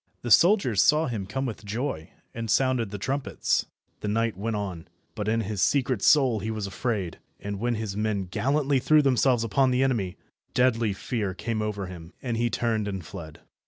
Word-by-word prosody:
The 120 - -3
soldiers 165 - +5
saw 150 +9 +4
him 110 -8 -3
come 135 +6 -2
with 110 -4 -5
joy, 105 - -3 0.2
and 115 -1 -5
sounded 125 -1 +2
the 105 - -5
trumpets. 135 +7 -1 0.3
The - - -4
knight 115 +1 0
went 110 +4 -2
on, 95 -5 -4 0.3
but 105 -2 -4
in 115 +1 +2
his 105 -2 -3
secret 130 -6 +2
soul 130 -5 +4
he 110 - -4
was 110 -2 -3
afraid, 100 -3 -3 0.2
and 100 -1 -5
when 120 +2 0
his 110 -3 -4
men 105 -2 0
gallantly 140 +8 +1
threw 155 +3 +4
themselves 130 -3 +3
upon 130 +4 +2
the 130 +1 +2
enemy, 100 -8 0 0.4
deadly 120 -3 +3
fear 100 -2 -3
came 110 +2 -2
over 105 -2 -3
him, 85 -2 -10
and 120 -3 -3
he 120 +1 +1
turned 110 -3 0
and 95 -4 -4
fled. 80 0 -9
110 Hz, 190 wpm, -26 LUFS, 100-130 Hz, 0.4 s, soldiers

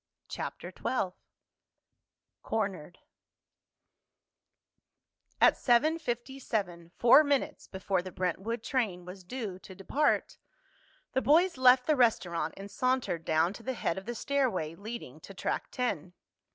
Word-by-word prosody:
CHAPTER - - -6
XII 195 -8 -1 1.3
CORNERED 190 -6 -3 2.4
At - - +6
seven 300 +7 +3
fifty 255 -1 -4
seven, 175 -9 -3
four 245 +6 +7
minutes 285 +1 -1
before 190 -1 -1
the 185 +1 -8
Brentwood 190 +6 -2
train 210 -11 -1
was 185 +1 -10
due 205 -3 -5
to 190 - -12
depart, 275 +10 0 0.7
the 260 - +2
boys 340 +7 +4
left 255 -1 +6
the 305 - +3
restaurant 175 - +1
and 195 +1 -9
sauntered 255 -10 0
down 160 +4 +2
to 230 - -11
the 260 +3 -3
head 190 -6 -2
of 190 - -16
the 240 - -3
stairway 230 - 0
leading 220 +7 -8
to - - -12
Track - - -2
Ten. 185 - -3
225 Hz, 125 wpm, -30 LUFS, 180-260 Hz, 2.4 s, four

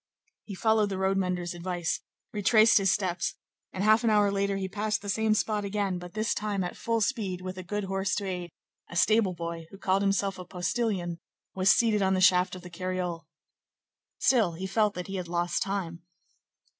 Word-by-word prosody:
He 200 - -7
followed 220 +1 +2
the 195 - -3
road 190 +1 +1
mender's 180 -2 -1
advice, 175 -1 -2 0.3
retraced 215 +2 +5
his 195 -1 +3
steps, 180 -3 -1 0.4
and, 190 - -3
half 215 +3 +5
an 230 - +3
hour 205 -2 +4
later, 200 0 0
he 190 -1 -2
passed 210 +2 -2
the 205 - -5
same 220 +1 +2
spot 210 -1 0
again, 200 -2 -1
but 175 +1 -10
this 215 +1 0
time 205 -2 -2
at 180 - -4
full 230 -1 -1
speed, 200 -6 -1
with 185 0 -5
a 185 - -6
good 205 +3 -3
horse 195 +1 -1
to 205 - -3
aid; 180 -2 -4 0.4
a - - -9
stable 205 +1 +3
boy, 170 -1 -5
who 195 - -12
called 195 0 +1
himself 195 -1 0
a - - -5
postilion, 180 -1 -2 0.3
was 190 +1 +2
seated 220 -3 +4
on 190 0 +2
the - - +1
shaft 185 0 +4
of 180 - -10
the 180 - -9
cariole. 180 -2 -3 0.9
Still, 225 -10 +3
he 180 +4 -5
felt 205 +2 +1
that 180 - -4
he 195 0 -5
had 180 -2 -4
lost 175 0 -1
time. 190 -4 -3
195 Hz, 200 wpm, -28 LUFS, 180-210 Hz, 0.9 s, retraced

